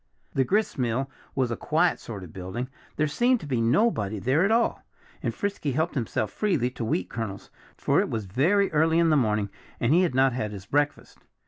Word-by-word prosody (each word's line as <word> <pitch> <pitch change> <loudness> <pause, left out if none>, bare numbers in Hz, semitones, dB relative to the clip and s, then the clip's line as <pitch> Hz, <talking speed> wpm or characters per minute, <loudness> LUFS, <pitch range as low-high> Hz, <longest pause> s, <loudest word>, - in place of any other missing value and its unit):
The 135 - +3
gristmill 135 - 0 0.2
was 130 -3 +1
a - - 0
quiet 165 +7 +1
sort 100 -5 -7
of 85 - -11
building. 95 +8 -5 0.3
There 155 - +2
seemed 240 - +2
to - - -7
be 130 -5 0
nobody 115 - +2
there 130 - +2
at 195 - +3
all. 230 +1 +2 0.4
And - - -1
Frisky 195 -9 -2
helped 160 +5 0
himself 110 -4 -1
freely 155 - 0
to 125 - -5
wheat 95 -5 -1
kernels, 110 -3 -6 0.3
for - - +2
it - - 0
was 110 -3 -3
very 170 - +2
early 160 +1 +3
in 170 -1 +4
the - - +5
morning 105 -6 +1 0.3
and 120 +5 +2
he 175 - +5
had 170 -8 +1
not 130 -1 +4
had 110 -4 -3
his 100 -1 -8
breakfast. 145 +6 -1
130 Hz, 205 wpm, -26 LUFS, 110-165 Hz, 0.4 s, the